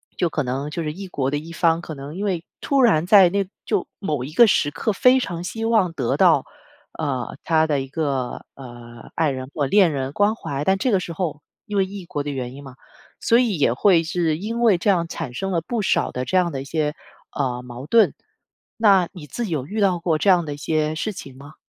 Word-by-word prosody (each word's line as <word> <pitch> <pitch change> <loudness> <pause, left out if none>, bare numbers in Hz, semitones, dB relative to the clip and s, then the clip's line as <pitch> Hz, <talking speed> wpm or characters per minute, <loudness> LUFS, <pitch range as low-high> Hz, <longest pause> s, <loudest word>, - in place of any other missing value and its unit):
就 175 - 0
可 150 -1 -2
能 135 +3 -3
就 165 +3 -4
是 150 -1 -3
异 195 +3 -8
国 135 -6 -2
的 145 - -1
一 160 +3 -10
方， 170 -1 +1
可 160 -2 -7
能 140 +3 -8
因 195 - -4
为 180 -5 -2 0.2
突 275 -2 +2
然 180 -10 +4
在 195 -3 +7
那 200 +1 -1 0.2
就 205 -5 -1
某 150 -10 -2
一 135 - -7
个 235 +9 +7
时 175 -8 +2
刻 145 +9 -2
非 250 +6 +5
常 175 -8 -4
希 225 +5 -4
望 220 -6 +2
得 135 -8 -1
到， - - +4 0.5
呃， 130 -7 -3
他 160 -1 +3
的 145 -3 0
一 135 - -6
个， 135 -4 -3
呃， 120 -3 -12
爱 160 -3 +1
人 130 -1 -6
或 145 - 0
恋 185 +4 +4
人 135 -2 -3
关 205 +4 +2
怀， 140 -9 -4
但 190 0 +3
这 245 +6 0
个 195 - +3
时 175 -2 -6
候， 160 -4 -3 0.2
因 210 - -3
为 195 - +3
异 195 -1 -8
国 145 - -4
的 145 - -4
原 130 -3 -4
因 140 +1 -11
嘛， 130 -2 -11 0.4
所 235 - +3
以 230 -7 +1
也 140 -5 +2
会 170 +5 +4
是 165 -2 0
因 225 +6 -4
为 220 -6 +5
这 170 - -4
样， 175 -4 +3
产 165 -6 -6
生 195 +9 -3
了 170 -2 0
不 230 +7 -3
少 195 - +1
的 125 - -3
这 185 - +1
样 180 -2 +2
的 135 -3 -4
一 - - -8
些， 150 +1 -1 0.4
呃， 125 -3 -2
矛 125 +2 -9
盾。 225 +5 +4 0.6
那 195 -6 +4
你 175 -6 -10
自 190 - -4
己 - - -6
有 145 -5 -2
遇 210 +8 -3
到 190 -3 +3
过 165 -2 0
这 200 - +2
样 175 -3 +4
的 145 - -4
一 - - -9
些 155 +1 -1
事 170 +7 -3
情 140 -9 -10
吗？ 145 +3 -13
165 Hz, 265 characters per minute, -22 LUFS, 140-195 Hz, 0.6 s, 在